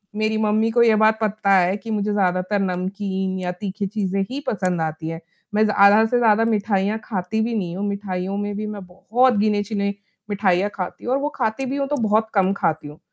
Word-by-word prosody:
मेरी 215 0 0
मम्मी 220 +1 +1
को 235 0 +4
ये 225 -2 +5
बात 220 +1 +4
पता 205 -2 +2
है 185 +2 +2
कि 220 +3 -8
मुझे 210 0 -1
ज़्यादातर 185 0 0
नमकीन 190 +1 -2
या 180 -1 -2
तीखी 195 +2 -4
चीज़ें 195 -1 -2
ही 270 +2 -4
पसंद 185 -5 0
आती 160 0 -3
हैं, 165 +1 -6 0.3
मैं 215 +1 +3
ज़्यादा 210 +1 +5
से 245 +2 +1
ज़्यादा 225 -1 +4
मिठाइयाँ 210 -1 0
खाती 210 +1 -2
भी 230 +1 -1
नहीं 180 -4 -3
हूँ, 205 - -2
मिठाइयों 195 -1 -3
में 205 0 -3
भी 215 - -3
मैं 205 -3 -7
बहुत 235 +8 +1
गिने-चुने 205 -1 0 0.4
मिठाइयाँ 195 -1 +1
खाती 185 +3 -6
हूँ 250 - 0
और 275 - +1
वो 295 - -1
खाती 220 +5 -1
भी 265 +2 -3
हूँ 275 -1 -1
तो 295 - -1
बहुत 220 +1 +2
कम 195 -1 +3
खाती 155 -5 -1
हूँ। 150 +1 -12
205 Hz, 210 wpm, -22 LUFS, 190-220 Hz, 0.4 s, ये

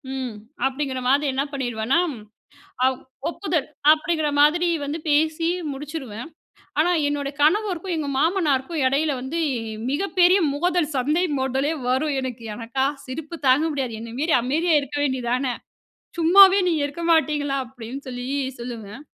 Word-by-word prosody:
"ம்" 255 -3 -4 0.3
அப்டிங்கிற 265 -1 -2
மாதிரி 280 +2 +3
என்னா 270 +2 0
பண்ணிருவேன்னா 245 +1 0 0.9
அ - - +6 0.4
"ஒப்புதல்" 330 -3 -2 0.3
அப்டிங்கிற 315 -1 0
மாதிரி 340 +4 +4 0.2
வந்து 290 +3 -3
பேசி 315 +2 +2 0.2
முடிச்சுடுவேன். 270 -4 -7 0.5
ஆனா 340 +3 +3 0.2
என்னோட 285 -1 -2
கணவருக்கும், 365 +1 +1
எங்க 295 -2 -2
மாமனாருக்கும் 315 -2 +1
எடயில 285 +3 +1
வந்து 300 +6 -3 0.5
மிகப்பெரிய 370 +3 +3 0.2
மோதல், 350 0 +1
சண்டை 300 +8 +1
மோதலே 265 +3 0
வரும், 275 +3 +1
எனக்கு 245 -3 -6
எனக்கா 240 +4 -2 0.2
சிரிப்பு 310 +5 -6
தாங்க 265 +4 +5
முடியாது. 255 -6 -3
"என்ன 230 0 -8
மாரி 315 +1 +3
அமைதியா 310 +7 +1
இருக்க 285 +1 -6
வேண்டிய 260 -3 -1
தானே! 255 0 0 0.7
சும்மாவே 380 +4 +7
நீங்க 320 -4 +1
இருக்க 285 +4 -7
மாட்டீங்களா?" 295 -3 +1
அப்டின்னு 250 +2 -9
சொல்லி 245 -1 -5 0.3
சொல்லுவேன். 235 -1 -7
290 Hz, 130 wpm, -23 LUFS, 260-325 Hz, 0.9 s, சும்மாவே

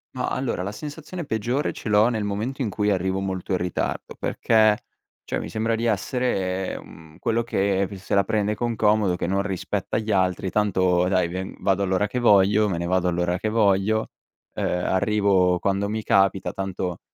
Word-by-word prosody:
Ma 125 - -2
allora 125 -8 -2
la 100 - -3
sensazione 155 +7 -7
peggiore 120 +5 -1
ce 110 - -6
l'ho 105 +2 +5
nel 110 -3 -1
momento 110 +7 -3
in 115 - 0
cui 105 0 0
arrivo 95 0 0
molto 95 0 -4
in 90 - +3
ritardo, 90 0 -3
perché 110 -2 +3 0.5
cioè - - -3
mi - - -6
sembra 115 +1 0
di 115 +1 -2
essere, 95 -4 -1
mhmm, 80 -1 -15
quello 115 +1 0
che 100 -3 0
se 95 - -2
la 100 - +4
prende 105 +1 0
con 120 0 -2
comodo 105 -4 +3
che - - -2
non 100 +1 +1
rispetta 95 +1 -2
gli 110 -1 -2
altri, 95 -1 +1
tanto 95 -3 +2
dai 90 -2 +2
ve 95 +2 -5
vado 100 0 +1
all'ora 95 +2 +1
che 125 +5 -3
voglio, 105 -1 +4
me 85 - -1
ne 85 - -2
vado 90 0 +1
all'ora 90 +1 0
che 110 +3 -2
voglio, 110 0 +2 0.4
ehm, - - -2 0.2
arrivo 95 -2 +2
quando 100 +1 0
mi 110 +1 -2
capita, 95 -1 +2
tanto 95 -2 -4
100 Hz, 185 wpm, -24 LUFS, 95-110 Hz, 0.5 s, l'ho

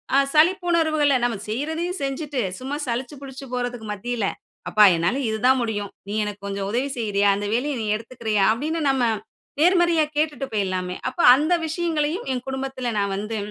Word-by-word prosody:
அ - - +6 0.2
சலிப்புணர்வுகள 325 -3 +3
நம்ம 240 -3 0
செய்றதையும் 320 - -2
செஞ்சுட்டு, 275 0 -2 0.2
சும்மா 265 +3 -4
சலிச்சி 245 +4 -3
புலிச்சி 270 0 -8
போறதுக்கு 245 -3 -3
மத்தியில, 225 +1 -3 0.4
"அப்பா 215 - +5
என்னால 175 +10 0
இதுதான் 250 +5 +3
முடியும், 205 -4 -3 0.2
நீ - - -3
எனக்கு 205 -1 -7
கொஞ்சம் 195 0 -3
உதவி 255 +5 0
செய்யிறியா? 205 -3 +2
அந்த 205 +1 -3
வேலையை 275 +5 0
நீ 215 - -3
எடுத்துக்கிறயா?" 220 -3 -1
அப்டின்னு 310 +7 -2
நம்ம 265 -2 +2 0.6
நேர்மறையா 345 -2 +4
கேட்டுட்டு 300 -3 0
பேயிடலாமே. 185 -3 -1
அப்ப 255 - -14 0.2
அந்த 305 +6 +1
விஷயங்களையும் 325 +3 -1
என் 250 -1 -4
குடும்பத்துல 265 -1 -4
நா - - +2
வந்து 210 +3 -4
255 Hz, 155 wpm, -23 LUFS, 215-305 Hz, 0.6 s, அ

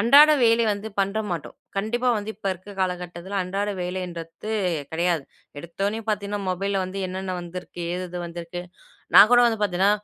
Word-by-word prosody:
அன்றாட 285 +8 +8
வேலை 230 0 +5
வந்து 205 +1 -3
பண்ண 195 +2 0
மாட்டோம். 165 -4 -4 0.2
கண்டிப்பா 240 +5 0
வந்து 210 +1 -4
இப்ப 200 - -8
இருக்க 185 +3 -11
காலகட்டத்துல 180 +1 -3
அன்றாட 195 +3 -2
வேலைன்றத்து 180 +1 -5 0.4
கெடையாது. 170 -1 +1 0.4
எடுத்தவுடனே 195 +6 -2
பார்த்தீங்கன்னா 205 -1 -1
மொபைல்ல 195 +2 -1
வந்து 185 +2 -5
என்னன்ன 185 0 -4
வந்திருக்கு, 175 0 -7
ஏது 180 +1 -3
எது 175 0 -5
வந்திருக்கு. 170 +1 -6 0.5
நான் 210 - +10
கூட 245 - +8
வந்து 225 -2 +1
பார்த்தீன்னா, 195 +1 +3
190 Hz, 155 wpm, -24 LUFS, 175-205 Hz, 0.5 s, நான்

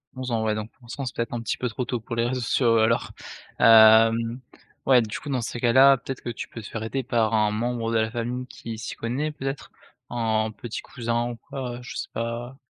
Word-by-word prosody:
11 130 -1 -5
ans 110 -1 0
ouais, 110 -1 +1
donc 110 +1 -5 0.2
c'est 130 +1 -5
peut-être 115 0 -3
un 120 - -2
petit 115 - -2
peu 125 - -2
trop 125 +2 -3
tôt 125 -1 -2
pour 115 +1 -6
les 115 0 +1
réseaux 125 0 -2
sociaux 115 -1 +2
alors, 110 +1 +2 0.5
hem, 115 +1 +6 0.5
ouais, 130 -2 +6
du 110 -2 -4
coup, 145 - -8
dans 130 -3 0
ces 120 +1 -4
cas-là, 130 +3 +6
peut-être 135 +1 -7
que 120 - -5
tu 115 - -5
peux 115 - -9
te 100 - -9
faire 110 -1 -5
aider 135 +4 -2
par 115 -3 +1
un 105 -1 +3
membre 115 +1 -2
de 115 - +2
la 110 0 0
famille 125 +1 -3
qui 115 -2 -8
s'y 110 - -6
connaît 135 +7 -2
peut-être? 135 -1 -5 0.4
Un 110 -2 0
petit 115 +1 -6
cousin 120 -1 -2
ou - - -6
quoi 125 -2 -6
je 120 - -9
sais - - -4
pas? 120 +3 -4
115 Hz, 225 wpm, -25 LUFS, 115-125 Hz, 0.5 s, hem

